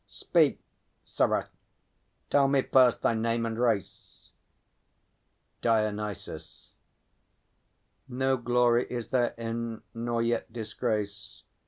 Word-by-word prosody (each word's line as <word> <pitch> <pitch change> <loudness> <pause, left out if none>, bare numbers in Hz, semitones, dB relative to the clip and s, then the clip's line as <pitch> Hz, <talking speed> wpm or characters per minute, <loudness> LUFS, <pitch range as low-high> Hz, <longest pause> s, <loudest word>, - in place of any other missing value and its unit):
Speak, - - +1 0.5
sirrah; - - 0 0.8
tell 140 -1 +5
me 135 -1 +2
first 125 -2 +4
thy - - +3
name 115 +1 0
and 115 0 -3
race. 115 -7 -2 1.3
DIONYSUS. 105 -3 -2 1.3
No 130 +1 0
glory 120 0 +2
is 120 -2 -5
therein, 115 -2 -2
nor 115 0 -1
yet 120 0 -1
disgrace. 105 -3 -4
115 Hz, 85 wpm, -28 LUFS, 110-125 Hz, 1.3 s, tell